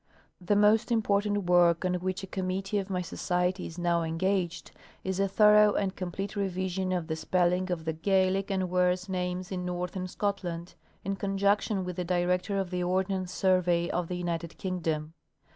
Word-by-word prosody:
The 205 +4 +2
most 210 +3 +4
important 205 -2 +1
work 175 0 +4
on 180 - +1
which 185 +2 -2
a - - -2
committee 190 +2 -2
of 195 0 -5
my 180 -1 -1
Society 180 +1 -1
is 165 - -10
now 175 -1 +1
engaged 170 0 -1 0.3
is 190 0 -2
a 195 - +3
thorough 210 +1 +5
and 195 -2 -1
complete 195 +3 -4
revision 185 -1 -2
of 180 -3 -1
the 160 -1 -3
spell 175 +2 +1
ing 185 +1 -1
of 165 -2 -3
the 160 - -1
Gaelic 190 +3 +1
and 190 -2 -1
worse 180 +1 +2
names 180 0 -3
in 180 -1 -3
northern 180 +1 -3
Scotland, 180 -3 -3 0.3
in 195 0 -2
con 195 0 -2
junction 200 -1 +1
with 180 0 -5
the 180 - -1
director 180 +2 0
of 190 -2 -2
the 180 0 -1
Ordnance 185 0 -1
Survey 180 -2 +2
of 175 -1 -1
the 180 - -3
United 170 -2 -3
Kingdom. 160 -4 -2
185 Hz, 180 wpm, -29 LUFS, 175-195 Hz, 0.3 s, thorough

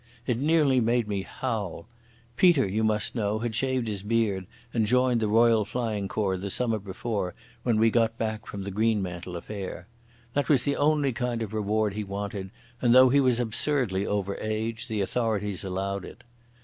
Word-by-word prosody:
It 120 -3 0
nearly 145 -3 +3
made 120 0 +1
me 100 -2 -1
howl. 105 -7 -4 0.5
Peter, 165 - +5
you 105 +4 -1
must 105 -1 +1
know, 105 -2 0
had 115 0 -3
shaved 130 +1 0
his 105 -3 -3
beard 105 -3 0 0.3
and 110 -3 +1
joined 125 0 +3
the 110 - 0
Royal 115 0 +4
Flying 110 -3 -2
Corps 95 -1 -1
the 100 +2 -4
summer 115 +1 0
before 100 -1 -3 0.3
when 120 -2 +1
we 115 0 +4
got 115 -1 +2
back 110 -1 -3
from 100 -1 -6
the 100 - -5
Greenmantle 95 -5 -1
affair. 95 +2 -6 0.5
That 145 - 0
was 135 -5 +4
the 140 +1 0
only 145 -2 +2
kind 120 -1 -2
of 110 -1 -7
reward 105 -1 0
he 105 +1 -3
wanted, 100 -1 -5 0.3
and, 120 -1 +4
though 130 0 +8
he 140 +3 +4
was 130 -3 +3
absurdly 120 -3 0
over 100 -1 -1
age, 110 +2 -3
the 110 -4 -1
authorities 105 -2 -1
allowed 95 +1 -3
it. - - -12
110 Hz, 180 wpm, -27 LUFS, 100-120 Hz, 0.5 s, though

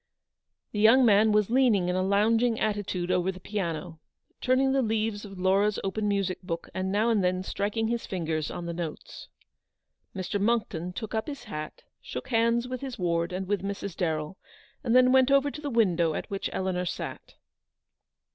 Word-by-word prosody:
The 210 - -3
young 230 +5 +6
man 215 0 +5
was 210 0 +2
leaning 235 -8 +3
in 180 - 0
a 185 - +1
loungiug 220 +4 +2
attitude 200 -4 -1
over 180 +1 +1
the 185 - -11
piano, 175 -4 -4 0.4
turning 265 +1 +3
the 270 0 +2
leaves 220 -2 -1
of 195 -2 -10
Laura's 195 +3 +2
open 210 +2 -1
music 195 -2 -1
book, 170 -2 -5
and 190 0 -2
now 215 +4 +2
and 210 -4 +2
then 185 0 0
striking 210 +4 -1
his 235 0 -2
fingers 160 -4 -2
on 175 - -6
the 170 - -3
notes. 165 -2 -7 0.9
Mr. 190 +2 -2
Monckton 205 -6 0
took 210 +4 -6
up 220 0 -1
his 280 -4 -6
hat, 155 -9 -7 0.2
shook - - -7
hands 230 0 +2
with 255 -1 -5
his 265 -3 -5
ward 170 -1 0
and 185 +1 -4
with 205 -2 0
Mrs. 200 -1 -5
Darrell, 160 0 -2 0.4
and 235 -1 +1
then 255 0 +6
went 260 0 +5
over 275 +1 +3
to 300 - -8
the 290 - -3
window 175 - +2
at - - -5
which 195 - -2
Eleanor 185 -1 -1
sat. 175 - -6
200 Hz, 185 wpm, -27 LUFS, 180-230 Hz, 0.9 s, young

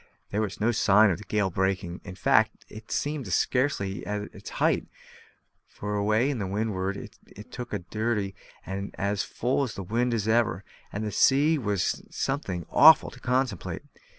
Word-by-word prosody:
There 105 - 0
was 105 -3 -3
no 110 +3 +2
sign 105 -2 +5
of 85 - -2
the - - -9
gale 100 -3 0
breaking; 95 -1 -1
in 90 - -8
fact, 90 - +2
it 110 0 -12
seemed 145 -2 -2
to - - -7
be - - -1
scarcely 125 -7 0
at 105 0 -4
its - - -9
height, - - +1 0.8
for 105 0 -6
away 110 +7 +2
to 105 -7 -3
windward 100 -1 -2
it 105 +5 -12
looked 120 -1 -5
as 105 - -2
dirty 105 -3 -1 0.3
and 100 +1 -5
as 100 0 0
full 130 +4 -1
of 105 -8 -4
wind 120 +1 +1
as 110 -2 -2
ever; 110 -5 +2 0.3
and 105 - -4
the 105 - -2
sea 145 +8 +4
was 100 -6 -1
something 100 - -3
awful 160 +1 +7
to - - -13
contemplate. 125 -6 -1
105 Hz, 175 wpm, -27 LUFS, 100-120 Hz, 0.8 s, awful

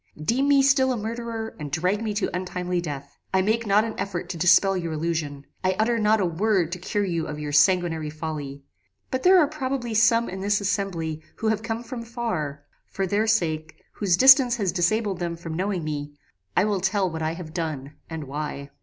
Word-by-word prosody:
Deem 240 - +1
me 280 -1 +5
still 270 -1 +4
a 250 - -1
murderer, 225 0 -5
and 145 -2 -6
drag 180 +7 0
me 220 - -1
to 205 -3 -2
untimely 180 -1 -2
death. 140 -4 -7 0.2
I 190 - +4
make 220 +3 0
not 205 +2 +4
an 225 -1 -3
effort 185 -3 -3
to 175 - -4
dispel 185 +3 +5
your 170 -3 -3
illusion: 155 -3 -3 0.2
I 185 0 +2
utter 230 +2 +1
not 215 0 +3
a 190 - +2
word 180 0 +1
to 180 - -4
cure 205 +3 -1
you 170 -3 -2
of 150 - -5
your 150 -1 -4
sanguinary 165 0 +3
folly: 150 -3 -6 0.5
but 260 - -1
there 370 +4 +6
are 335 - +6
probably 265 -5 -3
some 230 +2 +4
in 190 +1 -6
this 205 +1 +1
assembly 185 -6 -2
who 220 - -1
have 220 -1 0
come 225 +1 -4
from 240 0 -6
far: 225 - -4 0.2
for 195 - -2
their 205 +4 0
sakes, 160 -8 0 0.2
whose 185 -4 +1
distance 265 -2 +7
has 200 -6 0
disabled 195 +2 0
them 170 -1 -2
from 165 -1 -7
knowing 185 -1 -1
me, 145 -1 -4 0.4
I 185 - +5
will 205 -3 0
tell 190 0 +1
what 160 -2 -5
I 160 +1 -1
have 165 -3 -9
done, 155 -5 -4 0.2
and 160 -2 -5
why. 140 0 -5
185 Hz, 205 wpm, -25 LUFS, 160-220 Hz, 0.5 s, distance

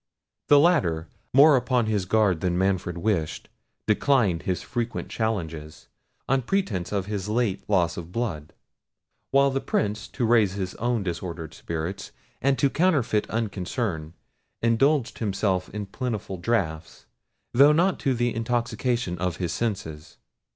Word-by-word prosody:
The 145 - +7
latter, 125 - +3 0.2
more 145 +3 +7
upon 125 -2 +1
his 105 -4 0
guard 100 -4 +2
than 90 -1 0
Manfred 95 -2 0
wished, 85 -4 -1 0.4
declined 105 -5 +2
his 90 -1 -2
frequent 120 -1 -3
challenges, 80 -9 -4 0.4
on 135 0 +2
pretence 120 - -1
of 100 -2 -1
his 105 -1 -4
late 110 -3 0
loss 90 -5 +2
of 85 0 -7
blood; 90 -10 -3 0.8
while 140 0 +4
the 135 0 -1
Prince, 105 +1 -1
to 125 - -2
raise 110 -5 +4
his 95 -2 -4
own 120 -2 0
disordered 85 -2 -5
spirits, 85 +4 -5 0.3
and 135 0 +2
to 140 - +3
counterfeit 140 - +1
unconcern, 100 - -3 0.5
indulged 120 +3 +2
himself 95 -3 0
in 105 0 -5
plentiful 105 -3 -4
draughts, 85 -5 -2 0.5
though 140 +4 +7
not 175 +4 +2
to 135 -2 +1
the 120 0 0
intoxication 115 -4 -1
of 90 -1 -1
his 85 -3 -2
senses. 80 -9 -4
105 Hz, 135 wpm, -25 LUFS, 90-120 Hz, 0.8 s, The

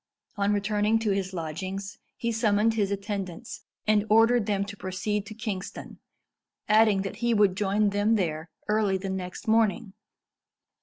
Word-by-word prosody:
On 200 -1 +1
returning 210 +2 +1
to 220 -2 0
his 195 -1 -1
lodgings, 185 +4 -5 0.2
he 235 - -1
summoned 220 -1 +2
his 205 -3 0
attendants, 200 0 -5 0.2
and 215 -1 +3
ordered 225 +1 +4
them 200 -1 0
to 205 0 -8
proceed 200 +2 -3
to 215 - -8
Kingston, 210 -3 -6 0.7
adding 215 -2 +4
that 195 - -5
he 235 -1 +1
would 205 -3 +4
join 205 +1 +1
them 205 +3 +2
there 165 -4 -2 0.2
early 210 -2 +2
the 190 0 -4
next 185 +5 -6
morning. 220 -1 +2
205 Hz, 150 wpm, -27 LUFS, 195-215 Hz, 0.7 s, ordered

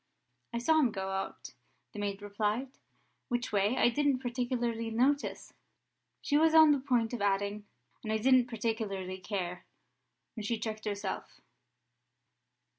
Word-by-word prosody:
"I 235 - -2
saw 315 +7 +3
him 265 -6 +4
go 190 -1 -4
out," 195 0 -5 0.4
the 210 - -7
maid 200 0 -3
replied. 210 +5 -1 0.6
"Which 245 -1 -2
way 205 +4 +2
I - - +5
didn't 285 +2 +2
particularly 240 -2 -2
notice 265 +6 0 0.3
" - - -52
She 290 0 +3
was 320 0 +4
on 315 -1 +9
the 285 - +3
point 245 -4 0
of 240 - -3
adding, 200 +1 0 0.4
"and 215 - -3
I 220 - +2
didn't 255 +2 +4
particularly 215 -5 -3
care," 185 -3 -4 0.7
when 220 - -6
she 230 +2 -1
checked 215 0 -5
herself. 200 -2 -4
225 Hz, 145 wpm, -31 LUFS, 205-250 Hz, 0.7 s, on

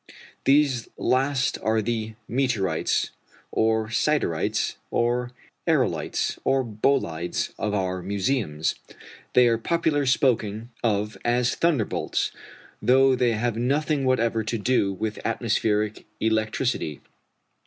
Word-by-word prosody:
These 135 -4 +3
last 130 0 +1
are 110 0 +2
the 110 0 -2
meteorites, 110 -10 0 0.4
or 110 0 +1
siderites, 110 - 0
or 120 +1 0 0.4
aërolites, - - 0
or 135 -1 +2
bolides, 105 -7 -1
of 105 -1 -1
our 95 -2 -1
museums. 95 - -1 0.6
They 125 -1 +6
are 115 -1 +2
popularly 150 0 +1
spoken 115 -4 +1
of 105 -2 0
as 120 0 +2
thunderbolts, 150 -11 0 0.5
though 130 +3 +5
they 125 -2 +2
have 115 +1 -1
nothing 140 +4 +1
whatever 115 -3 +1
to 115 +2 -2
do 110 -2 +1
with 105 +3 -4
atmospheric 110 -2 0
electricity. 110 - 0
115 Hz, 105 wpm, -25 LUFS, 105-130 Hz, 0.6 s, They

